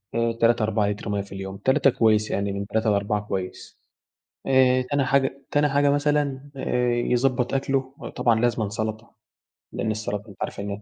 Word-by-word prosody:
آآ، 115 0 +1
3، 115 0 +2
4 105 -1 +1
لتر 105 0 -4
مَيَّة 100 -1 0
في 100 - -12
اليوم، 95 0 -6
3 130 +5 +3
كويس 110 -3 +2
يعني 100 0 -1
من 100 0 -4
3 110 0 0
ل4 105 +1 0
كويس. 95 -3 -6 0.7
آآ، 130 -1 +4
تاني 145 -1 +2
حاجة 140 0 +1
تاني 145 0 +3
حاجة 140 0 +3
مثلًا 145 -1 0
آآ، 125 -2 0
يضبط 125 +1 +1
أكله 135 0 -1
وطبعًا 115 -2 0
لازمًا 120 -3 +1
سلطة، 110 +2 -5 0.6
لأن 110 - -1
السلطة 105 0 -4
أنتَ 100 - -14
عارف - - -4
إن 100 0 -5
115 Hz, 170 wpm, -24 LUFS, 105-135 Hz, 0.7 s, آآ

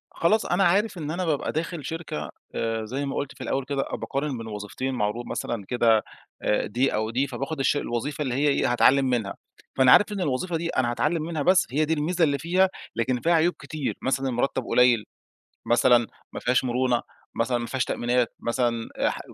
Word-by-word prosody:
خلاص 210 +6 +2
أنا 180 +3 +2
عارف 195 +3 +2
إن 155 -2 -4
أنا 180 +2 -2
بابقى 155 -4 0
داخل 165 -1 -4
شركة، 160 - -5 0.3
آآ، 115 -1 -1
زي 135 +6 -3
ما 135 - -3
قُلت 140 - -3
في - - -12
الأول 135 -1 -1
كده، 140 0 -1
بأقارن 140 -1 -2
بين 115 -1 -7
وظيفتين 105 +5 -4
معروض 110 +2 -1
مثلًا 115 -4 -4
كده، 115 -3 +3 0.4
آآ، 105 - +1
دي 125 +6 +1
أو 110 +1 -1
دي، 130 +5 0
فبأخد 135 +4 -4
الش 135 +2 +2
الوظيفة 140 +3 -3
اللي 130 -4 -1
هي 145 +3 +2
إيه 140 -3 +2
هاتعلّم 135 +3 +4
منها. 120 -6 -1 0.4
فأنا 130 -1 +5
عارف 205 - +6
إن 200 -2 -3
الوظيفة 165 +3 -1
دي 170 +1 -3
أنا 125 -5 +1
هاتعلم 155 +6 0
منها 160 -2 -3
بس، 185 +5 +4
هي 150 +4 +2
دي 160 - 0
الميزة 165 +3 0
اللي 140 -3 +3
فيها، 185 +3 +2 0.3
لكن 120 +2 0
فيها 170 - +3
عيوب 170 +2 +3
كتير 155 -3 -4
مثلًا 135 0 0
المرتّب 130 +1 -1
قليل، 125 -3 +4 0.6
مثلًا 120 -1 +4 0.3
ما - - -4
فيهاش 125 +2 +2
مرونة، 125 -1 +1 0.4
مثلًا 120 +1 +1
ما 120 - -3
فيهاش 130 +1 -1
تأمينات، 120 0 0
مثلًا 115 -1 -1 0.2
ح - - -5
130 Hz, 200 wpm, -25 LUFS, 120-160 Hz, 0.6 s, عارف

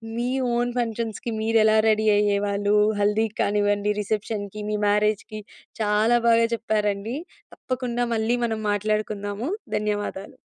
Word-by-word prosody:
మీ 240 +1 -1 0.3
own 245 0 0
ఫంక్షన్స్‌కి 230 0 -3
మీరు 225 0 +2
ఎలా 220 0 +4
రెడీ 215 0 +2
అయ్యేవాళ్ళు 205 0 +1 0.3
హల్దీ 210 +2 +2
కానివ్వండి, 205 0 +1
రిసెప్షన్‌‌కి, 210 0 -3
మీ 210 - 0
మ్యారేజ్‌‌కి 210 +1 0 0.4
చాలా 215 +3 +3
బాగా 230 0 +5
చెప్పారండి. 215 0 -1 0.4
తప్పకుండా 245 -2 -2
మళ్ళీ 225 +2 +1
మనం 220 -1 -2
మాట్లాడుకుందాము. 210 - -2 0.3
ధన్యవాదాలు. 205 -2 -3
215 Hz, 115 wpm, -24 LUFS, 205-225 Hz, 0.4 s, బాగా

